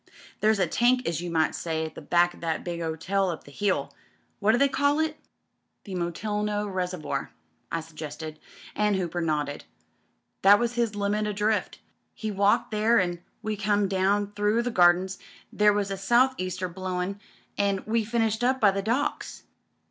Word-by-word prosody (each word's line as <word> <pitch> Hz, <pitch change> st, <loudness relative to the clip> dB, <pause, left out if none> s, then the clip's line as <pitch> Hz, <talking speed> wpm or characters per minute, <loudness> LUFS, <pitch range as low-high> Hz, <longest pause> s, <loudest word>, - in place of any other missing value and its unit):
There's 215 Hz, 0 st, +3 dB
a 190 Hz, -, +3 dB
tank 245 Hz, +8 st, +2 dB
as 170 Hz, 0 st, -1 dB
you 175 Hz, -, -4 dB
might 160 Hz, -1 st, +1 dB
say 160 Hz, -1 st, -2 dB
at 160 Hz, -, -7 dB
the -, -, -9 dB
back 175 Hz, +3 st, +3 dB
o' -, -, -15 dB
that 165 Hz, -1 st, -2 dB
big 170 Hz, -1 st, -4 dB
hotel 175 Hz, +4 st, -1 dB
up 165 Hz, -, -5 dB
the 140 Hz, -, -14 dB
hill 200 Hz, +5 st, -1 dB, 0.2 s
— -, -, -42 dB
^what 210 Hz, -, +4 dB
do 235 Hz, -, +3 dB
they 280 Hz, -, +4 dB
call 285 Hz, +1 st, +1 dB
it? 315 Hz, -1 st, 0 dB, 0.4 s
" -, -, -50 dB
"The 195 Hz, -, -8 dB
Molteno 210 Hz, +4 st, -2 dB
Reservoir," 180 Hz, -7 st, -3 dB, 0.4 s
I 165 Hz, -, -1 dB
suggested, 155 Hz, 0 st, -8 dB, 0.4 s
and 210 Hz, -1 st, +2 dB
Hooper 175 Hz, -2 st, -2 dB
nodded. 150 Hz, -3 st, -2 dB, 0.8 s
"That 200 Hz, +1 st, +8 dB
was 240 Hz, +1 st, -1 dB
his 235 Hz, -3 st, 0 dB
limit 205 Hz, +1 st, 0 dB
o' 210 Hz, -, -2 dB
drift. 210 Hz, +1 st, -1 dB, 0.4 s
We 215 Hz, -, -1 dB
walked 200 Hz, +2 st, +2 dB
there 220 Hz, +2 st, +3 dB
an' 175 Hz, -2 st, -1 dB, 0.2 s
we 215 Hz, 0 st, -1 dB
come 205 Hz, 0 st, +1 dB
down 200 Hz, +2 st, +1 dB
through 210 Hz, +3 st, +1 dB
the 245 Hz, -, -2 dB
Gardens 185 Hz, 0 st, +3 dB, 0.2 s
— -, -, -22 dB
^there 210 Hz, 0 st, +4 dB
was 200 Hz, -1 st, -1 dB
a 195 Hz, -, -2 dB
South 240 Hz, +7 st, +3 dB
Easter 185 Hz, 0 st, -2 dB
blowin' 185 Hz, +2 st, -4 dB, 0.2 s
— -, -, -37 dB
^an' 200 Hz, -1 st, +1 dB
we 225 Hz, +1 st, +1 dB
finished 225 Hz, 0 st, 0 dB
up 260 Hz, +1 st, +2 dB
by 205 Hz, -4 st, +5 dB
the 195 Hz, +1 st, -2 dB
Docks. 235 Hz, +8 st, -2 dB
200 Hz, 190 wpm, -26 LUFS, 175-215 Hz, 0.8 s, That